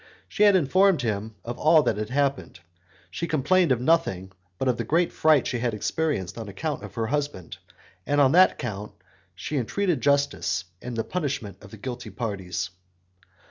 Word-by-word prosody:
She 210 - -5
had 205 -2 +7
informed 185 -1 +3
him 110 -1 -3
of 120 +1 -5
all 155 0 +5
that 110 - 0
had 105 0 -3
happened; 140 -7 -1 0.5
she 170 - -3
complained 160 +3 +2
of 125 - +3
nothing 110 - +1 0.3
but 130 - -2
of 125 -2 +2
the 115 - -2
great 165 +9 +1
fright 155 -4 +4
she 120 - -2
had 115 -2 -1
experienced 115 - -2
on 110 -2 -6
account 150 +8 -4
of - - -10
her 115 -2 -1
husband, 140 - -3 0.5
and 145 0 +2
on 135 -2 +5
that 185 +4 +5
count 105 -3 -5 0.4
she 150 - -4
entreated 165 - 0
justice 140 -10 +1 0.2
and 125 -1 -6
the 115 - 0
punishment 140 - -4
of 95 - -12
the 110 - -11
guilty 125 0 -6
parties. 95 -4 -4
130 Hz, 180 wpm, -25 LUFS, 110-155 Hz, 0.5 s, had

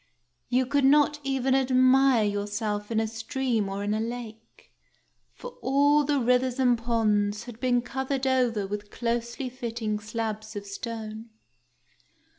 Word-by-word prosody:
You 255 +1 +2
could 280 +2 +1
not 295 +2 +4
even 270 -1 0
admire 260 -1 +4
yourself 205 0 -2
in 225 -1 +1
a 225 - +1
stream 225 -1 -2
or 195 +1 -4
in 205 +1 0
a 215 - 0
lake, 225 -1 -7 0.6
for - - -9
all 285 +3 +3
the 290 0 +1
rivers 250 +1 +2
and 250 -2 +4
ponds 215 -3 0
had 235 -2 -10
been 245 -1 +1
covered 265 +1 -3
over 245 -6 +1
with 205 +1 -5
closely 235 +3 -3
fitting 230 -4 -3
slabs 220 0 -5
of 205 0 -5
stone. 220 +2 -6
235 Hz, 140 wpm, -27 LUFS, 215-260 Hz, 0.6 s, not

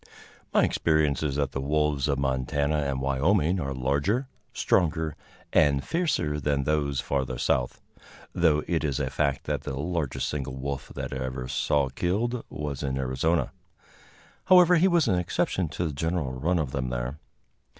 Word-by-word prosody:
] - - -27
My - - +6
experience 75 -4 +2
is 75 -3 -1
that 70 -2 0
the 70 - -3
wolves 75 -1 +1
of 70 -2 +1
Montana 70 +3 0
and 70 -3 -1
Wyoming 80 +7 +2
are 70 -4 -3
larger, 70 - 0 0.2
stronger 80 -3 +1 0.4
and 70 -3 +4
fiercer 135 - 0
than 70 -1 0
those 70 -2 0
further 65 -2 -2
south, 60 -1 0 0.5
though 80 -3 +3
it 85 -3 0
is 70 -3 -1
a 65 -2 -2
fact 70 0 0
that - - -2
the 65 - -5
largest 80 -3 -2
single 65 -3 -4
wolf 70 +1 -5
that - - -4
I 65 0 -3
ever 65 0 -4
saw 65 +2 +1
killed 110 - -1
was 75 -3 -4
in 65 -1 -2
Arizona. 65 +6 0 0.9
However, 180 -1 +7
he 175 +4 +5
was 170 -4 +3
an 90 - +2
exception 90 -1 -1
to 85 - -3
the 75 - -2
general 80 -1 -1
run 80 +8 0
of 75 -6 -1
them 65 -2 -2
there. 60 +4 -4
75 Hz, 170 wpm, -27 LUFS, 65-85 Hz, 0.9 s, However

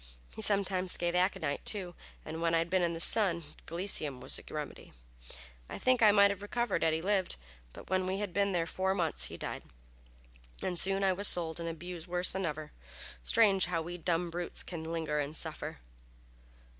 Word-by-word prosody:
He - - -8
sometimes 195 -3 +2
gave 175 0 -1
aconite, 180 -4 0
too; 185 -4 -1 0.3
and 160 +1 -6
when 165 0 +2
I - - +4
had 165 +1 -1
been 185 -1 +3
in 170 -1 0
the - - -6
sun, 175 -3 +3 0.2
gelseminum 165 -6 +3
was - - -4
the - - -4
remedy. - - -7 0.8
I - - -6
think 255 -2 +2
I 215 -2 +7
might 200 -1 +5
have 200 -1 -5
recovered 240 +4 -1
had 160 -1 +2
he 160 - -4
lived, 195 -1 0 0.4
but - - -12
when 185 0 0
I 190 - -1
had 200 -2 -4
been 200 +1 +1
there 170 -3 0
four 190 +3 -1
months 165 -5 +1
he - - -7
died, - - -5 1.0
and 180 -2 +1
soon 195 +1 +4
I 190 -1 +3
was 200 +2 +3
sold 165 -1 +1
and 170 0 -3
abused 170 +1 -7
worse 180 0 +3
than 190 -2 -2
ever. 150 0 -5 0.5
Strange, 200 -6 +4
how 165 -2 -1
we 175 +2 -7
dumb 170 0 -1
brutes 175 +1 -1
can 165 -2 -6
linger 160 -3 -2
and 145 +2 -3
suffer!" - - -5
180 Hz, 195 wpm, -31 LUFS, 165-195 Hz, 1.0 s, I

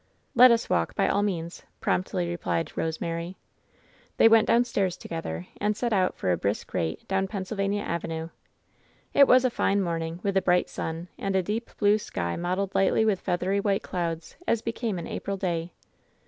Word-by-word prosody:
"Let 255 +1 +9
us 235 -1 +2
walk, 85 -1 0
by - - +2
all 200 - +2
means," 170 -4 -3 0.2
promptly 180 -1 0
replied 170 -1 -2
Kose 160 0 -2
mary. 170 +2 -4 0.8
Then 225 - +6
went 225 -1 +6
downstairs 230 -6 +2
together 90 - -5
and 210 0 0
set 240 -2 0
out 185 -2 +1
for 90 - 0
a 90 - +2
brisk 100 +2 -3
rate 80 -1 -2
down 195 0 0
Pennsylvania 200 +1 -2
Avenue. 165 -1 -3 0.8
It 280 -1 +7
was 255 +1 +6
a 255 - +2
fine 200 -3 +1
morning, 165 -2 -2
with 200 -1 0
a 190 - +4
bright 180 -1 +2
sun, 165 +2 -5
and 195 -1 -1
a 190 - +2
deep 220 +5 -3
blue 205 0 +4
sky 85 - -3
mottled 185 +3 -2
lightly 195 +3 +3
with 205 -4 +2
feathery 185 +2 0
white 200 0 0
clouds, 170 -2 -4
as 230 -1 +1
becamean 225 -6 -3
April 200 0 -4
day. 175 -2 -2
190 Hz, 175 wpm, -27 LUFS, 170-205 Hz, 0.8 s, Let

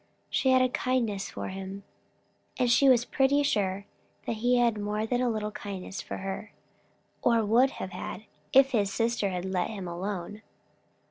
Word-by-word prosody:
She 265 - +2
had 260 0 +5
a 255 - +2
kindness 240 -6 -1
for - - -5
him, 195 +1 -7 0.7
and 250 -2 +2
she 275 +3 +6
was 245 -2 +5
pretty 280 +3 +2
sure 200 -6 0 0.4
he 245 +2 +1
had 235 -3 +2
more 210 +1 -1
than 245 +2 0
a 215 -4 -1
kindness 195 -2 -6
for - - -6
her, 195 +3 -5 0.7
or 230 -2 +3
would 240 +6 +4
have 185 - -5
had, 200 - -6 0.3
if 270 0 +6
his 205 -5 +1
sister 230 -2 0
had 180 -1 -3
let 185 -2 -1
him 200 -5 -6
alone. 190 +3 -5
215 Hz, 160 wpm, -28 LUFS, 195-245 Hz, 0.7 s, she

